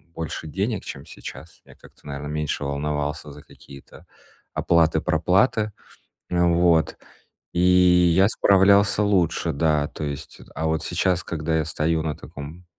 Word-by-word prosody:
больше 80 -1 -5
денег, 100 +6 -3
чем 70 - -8
сейчас. 80 0 -11
Я - - -17
как-то, - - -18
наверное, 70 +1 -6
меньше 75 -1 -3
волновался 75 +1 -3
за 75 - -12
какие-то 70 -1 -15 0.5
оплаты-проплаты. 85 +7 +2 0.6
А, 85 0 +2
вот. 85 -1 +2 0.6
И 85 - -1
я 90 0 +5
справлялся 100 +1 +4
лучше. 95 -5 +1
Да, 75 0 +1
то 80 - -7
есть. 70 -1 -7
Э, - - -14
а 80 - -2
вот 80 0 -1
сейчас, 90 0 0
когда 80 0 -2
я 80 - 0
стою 80 0 -1
на 75 -3 -3
таком, 75 +5 -10
80 Hz, 140 wpm, -23 LUFS, 75-90 Hz, 0.6 s, я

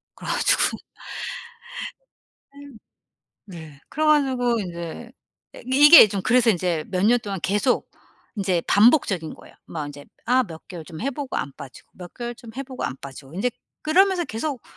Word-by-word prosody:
그래 - - -8
가지고 - - +2 2.7
네. 185 -3 -11
네 140 -1 -19
그래 310 +1 -2
가지고 255 -6 +2
인제 175 +6 -7 0.4
예 - - -10
이게 290 +1 +9
좀 195 -1 -3
그래서 245 -2 +4
인제 175 -4 -1
몇 185 +1 0
년 245 +2 +5
동안 195 -4 -5
계속 210 +6 0 0.5
인제 185 -4 0
반복적인 205 - +3
거예요. - - -17
뭐 155 -3 -5
인제 145 0 -10 0.2
아 255 +2 +4
몇 160 -4 -12
개월 170 -4 -8
좀 160 -2 -10
해 275 +4 -1
보고 280 0 -5
안 140 - -3
빠지고, 140 -3 -12
몇 180 -1 -11
개월 240 -1 -5
좀 230 -1 -13
해 275 - -3
보고 260 -1 -7
안 130 - -3
빠지고 135 +2 -11
인제 245 +7 0 0.3
그러면서 360 +3 +3
계속 255 +2 -4
215 Hz, 295 characters per minute, -23 LUFS, 170-260 Hz, 2.7 s, 이게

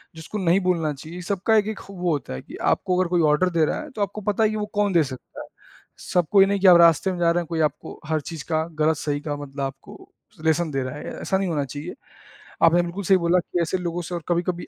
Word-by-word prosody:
जिसको 160 +6 -7
नहीं 185 -1 +3
बोलना 165 -4 +1
चाहिए, 160 +6 -9
सबका 200 +4 0
एक-एक 215 0 +1
ख - - -13
वो 180 -3 -2
होता 145 - -3
है 65 - -6
कि - - -12 0.2
आपको 185 -2 -1
अगर 185 - +2
कोई 175 -1 +2
ऑर्डर 180 +5 +2
दे 160 - +4
रहा - - -2
है 305 - -9
तो 220 - -6
आपको 205 +1 -2
पता 210 +2 +1
ही 215 - +3
है 215 - -3
वो 210 - -2
कौन 205 -1 +2
दे 170 -3 +5
सकता 130 -2 -9
है, - - -9 0.6
सबको 180 +3 +3
ही 195 - +8
नहीं 200 0 0
कि 195 - +4
आप 175 - +9
रास्ते 170 +2 +5
में 180 - -5
जा 170 -1 +3
रहे 175 - +1
हैं, 170 - -8
कोई 165 0 -3
आपको - - -12
हर 155 0 0
चीज़ 160 -4 -7
का 160 0 +1 0.2
गलत-सही 150 -2 0
का 145 -1 -3
मतलब 140 -1 -7
आपको 135 0 -8 0.3
लेसन 160 0 +2
दे 135 -1 -1
रहा 130 +1 -5
है, 150 - -8 0.2
ऐसा 190 - 0
नहीं 190 -2 -1
होना 150 -3 0
चाहिए। 145 +5 -7 0.7
आपने 170 +1 +6
बिल्कुल 175 +3 -5
सही 190 +1 +4
बोला 170 +2 +3
कि 175 0 -2
ऐसे 170 +3 0
लोगों 175 -1 -3
से 175 +1 -5
और 170 - -5
कभी-कभी 175 0 -1
175 Hz, 265 wpm, -23 LUFS, 155-190 Hz, 0.7 s, आप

